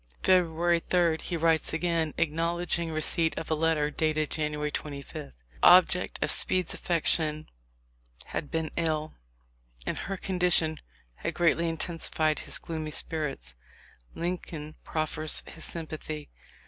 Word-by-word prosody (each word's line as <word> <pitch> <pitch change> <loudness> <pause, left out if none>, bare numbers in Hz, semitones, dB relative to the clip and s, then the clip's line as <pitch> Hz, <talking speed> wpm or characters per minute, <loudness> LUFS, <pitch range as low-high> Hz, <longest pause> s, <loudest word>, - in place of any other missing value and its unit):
February 175 -2 +3
3, 170 -3 +3
he 175 - -3
writes 165 -1 +2
again, 165 -2 0
acknowledging 170 +1 0
re 155 0 -1
ceipt 165 0 +1
of 160 - -4
a - - +5
letter 155 -1 +1
dated 155 0 0
January 150 -1 -1
25. 140 -2 -6
The 70 - -6 0.3
object 180 0 +6
of - - +2
Speed's 185 -2 +1
affection 155 -2 +1 0.8
had 145 - -4
been 160 -1 -2
ill, 155 -2 0 0.7
and - - -2
her 195 0 -4
condition 175 -4 +2 0.4
had - - -3
greatly 170 0 +3
intensified 160 -1 -1
his - - -1
gloomy 160 -2 -5
spirits. 150 - -2 0.6
Lincoln 165 -3 -4
prof 155 -1 -1
fers 155 0 0
his 165 - -5
sympathy. 155 -2 -5
160 Hz, 130 wpm, -28 LUFS, 155-170 Hz, 0.8 s, object